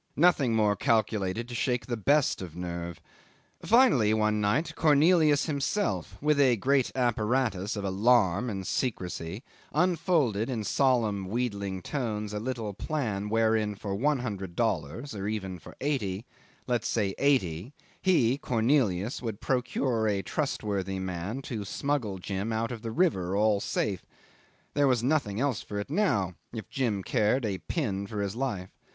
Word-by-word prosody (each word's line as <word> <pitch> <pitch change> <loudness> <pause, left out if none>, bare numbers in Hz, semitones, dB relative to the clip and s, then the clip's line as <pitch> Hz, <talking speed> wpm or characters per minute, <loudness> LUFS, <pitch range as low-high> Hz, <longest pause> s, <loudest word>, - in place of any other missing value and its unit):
Nothing 145 -7 +4
more 105 -2 +3
calculated 110 -2 0
to 120 - -8
shake 125 0 0
the 120 - -2
best 140 +5 +2
of 85 -4 -7
nerve. 85 -2 -5 0.6
Finally, 210 - +5
one 105 -1 +1
night, 150 +12 +1
Cornelius 155 0 +4
himself, 140 - -1
with 150 0 +2
a 130 -4 +5
great 135 +4 +2
apparatus 115 -4 0
of 100 - -4
alarm 105 +1 +3
and 95 -3 -4
secrecy, 95 -4 -3 0.3
unfolded 155 - +1
in 115 -4 -2
solemn 110 -5 +1
wheedling 100 -4 -2
tones 105 -6 -3
a 105 - -2
little 115 -3 -3
plan 105 - -2
wherein 110 -1 +2
for 100 0 -5
one 145 +8 +2
hundred 100 -8 -5
dollars 110 - -1
or 100 -1 -4
even 95 -4 -3
for - - -13
eighty; 115 -8 -1 0.4
let's 120 -3 0
say 100 -4 0
eighty 105 - +1 0.3
he, 140 -9 +3
Cornelius, 115 -5 +1
would 110 -4 -4
procure 125 -3 0
a 100 -2 0
trustworthy 100 - -2
man 95 +7 -4
to 110 -6 -4
smuggle 115 -1 -2
Jim 100 +4 -3
out 115 +1 -1
of 115 -3 -6
the 115 - -4
river, 110 - +1
all 105 -1 +3
safe. 100 -1 -2 0.7
There 145 -1 +3
was 125 -3 +2
nothing 125 -7 +1
else 135 -4 0
for 105 - -5
it 100 - -6
now 130 - +1 0.2
if 110 -2 -6
Jim 115 -8 -1
cared 120 +3 +1
a 100 -3 -2
pin 100 - -2
for 105 -1 -3
his 100 +1 -3
life. 100 -8 -3
110 Hz, 150 wpm, -28 LUFS, 100-135 Hz, 0.7 s, Finally